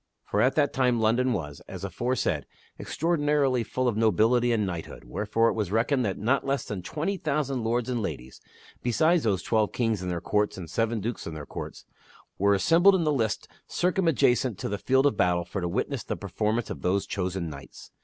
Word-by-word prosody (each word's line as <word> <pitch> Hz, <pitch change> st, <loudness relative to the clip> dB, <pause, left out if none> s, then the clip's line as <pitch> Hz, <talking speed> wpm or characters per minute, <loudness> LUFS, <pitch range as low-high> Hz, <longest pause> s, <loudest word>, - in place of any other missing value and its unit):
For 105 Hz, -, 0 dB
at 130 Hz, +3 st, +3 dB
that 145 Hz, -2 st, +2 dB
time 125 Hz, -3 st, +2 dB
London 120 Hz, +4 st, +2 dB
was, 75 Hz, -10 st, -4 dB
as -, -, -8 dB
aforesaid, 125 Hz, +1 st, -1 dB, 0.3 s
extraor 170 Hz, +2 st, -1 dB
dinarily 145 Hz, -4 st, +2 dB
full 130 Hz, +3 st, -1 dB
of 120 Hz, -, +1 dB
nobility 115 Hz, +3 st, +3 dB
and 110 Hz, -3 st, +1 dB
knighthood, 85 Hz, -4 st, -6 dB
wherefore 105 Hz, -, +1 dB
it -, -, -1 dB
was 105 Hz, -4 st, -2 dB
reckoned 125 Hz, +5 st, +2 dB
that 95 Hz, -3 st, -2 dB
not 125 Hz, +7 st, +1 dB
less 140 Hz, -2 st, -1 dB
than 100 Hz, -3 st, -5 dB
twenty 160 Hz, -, -3 dB
thousand 140 Hz, -7 st, -1 dB
lords 115 Hz, +1 st, 0 dB
and 125 Hz, -2 st, -1 dB
ladies 65 Hz, -, -6 dB, 0.4 s
(besides 160 Hz, +8 st, +3 dB
those 100 Hz, -7 st, 0 dB
twelve 110 Hz, -2 st, +1 dB
kings 115 Hz, -5 st, 0 dB
and 90 Hz, -, -3 dB
their 90 Hz, -1 st, -2 dB
courts 105 Hz, +3 st, 0 dB
and 85 Hz, -4 st, -8 dB
seven 115 Hz, +1 st, 0 dB
dukes 115 Hz, +3 st, -4 dB
and 80 Hz, -1 st, -6 dB
their 75 Hz, -, -7 dB
courts) -, -, -8 dB, 0.5 s
were 100 Hz, +1 st, +4 dB
assembled 170 Hz, -, +5 dB
in 180 Hz, -, +1 dB
the 155 Hz, -1 st, +2 dB
lists 115 Hz, -6 st, -1 dB, 0.2 s
circumadjacent 160 Hz, -, +2 dB
to -, -, -4 dB
the 100 Hz, 0 st, -3 dB
field 130 Hz, +3 st, +2 dB
of 140 Hz, -7 st, +2 dB
battle 90 Hz, -1 st, +2 dB
for 95 Hz, +3 st, -4 dB
to 90 Hz, -, -1 dB
witness 125 Hz, +7 st, -2 dB
the -, -, -4 dB
performance 105 Hz, +4 st, -2 dB
of -, -, -6 dB
those 95 Hz, +2 st, +1 dB
chosen 95 Hz, -2 st, -3 dB
knights. 70 Hz, -3 st, -11 dB
115 Hz, 205 wpm, -27 LUFS, 100-130 Hz, 0.5 s, assembled